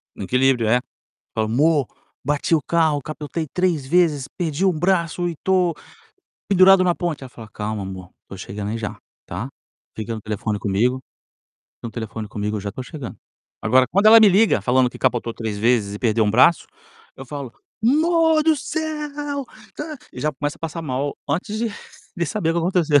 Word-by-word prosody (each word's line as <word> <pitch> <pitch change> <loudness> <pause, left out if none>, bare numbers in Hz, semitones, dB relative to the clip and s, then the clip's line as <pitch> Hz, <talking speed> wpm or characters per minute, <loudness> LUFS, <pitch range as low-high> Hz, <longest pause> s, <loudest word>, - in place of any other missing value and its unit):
No - - -6
equilíbrio, 125 -1 +2
é. 120 +3 +4 0.5
Falo: 110 -1 0
"Mô, 145 +2 +3 0.4
bati 145 +4 +1
o 155 - +1
carro, 160 -1 +1
capotei 155 +2 -5
3 175 -7 +1
vezes, 155 -3 +2
perdi 170 +1 -1
1 190 - +5
braço 175 0 +1
e 165 - -5
tô 185 -3 +2 0.8
pendurado 190 0 +7
na 175 -1 +3
ponte", 170 -6 -3
aí - - -7
ela 130 - -10
fala: 115 -3 -12
"Calma, 105 -1 -4
amor, 95 -1 -8 0.2
tô 100 - -9
chegando 100 +2 -5
aí 115 - -2
já, 110 -2 -5 0.3
tá? 100 +9 -5 0.5
Fica 110 +1 -4
no 110 - -6
telefone 105 0 -3
comigo 110 +6 +1 0.8
fica - - -7
no - - -9
telefone 110 -1 -6
comigo, 105 0 -3
eu - - -3
já 100 - -5
estou 130 - -7
chegando". 145 -5 -8 0.5
Agora 130 +3 +4
quando 200 +6 +3
ela 225 +1 +9
me 215 - +8
liga 200 - +4
falando 125 +3 +2
que - - -11
capotou 120 -1 0
3 110 -3 -4
vezes 110 -2 +2
e 105 - -5
perdeu 115 -2 +2
1 105 - +2
braço, 130 +9 +4 0.5
eu 135 - -8
falo, 140 -3 -6 0.3
amor 320 +3 +4
do 315 -1 +3
céu, 295 -1 -4 0.3
dã, 305 0 -5 0.2
e - - -8
já 150 - +1
começo 145 +2 -3
a - - -29
passar 165 0 -4
mal 140 0 -2
antes 205 +5 -2
de 235 - 0 0.5
de 170 -2 0
saber 180 -4 -1
o - - +1
que - - +1
aconteceu. 165 -4 +3
145 Hz, 195 wpm, -22 LUFS, 115-180 Hz, 0.8 s, ela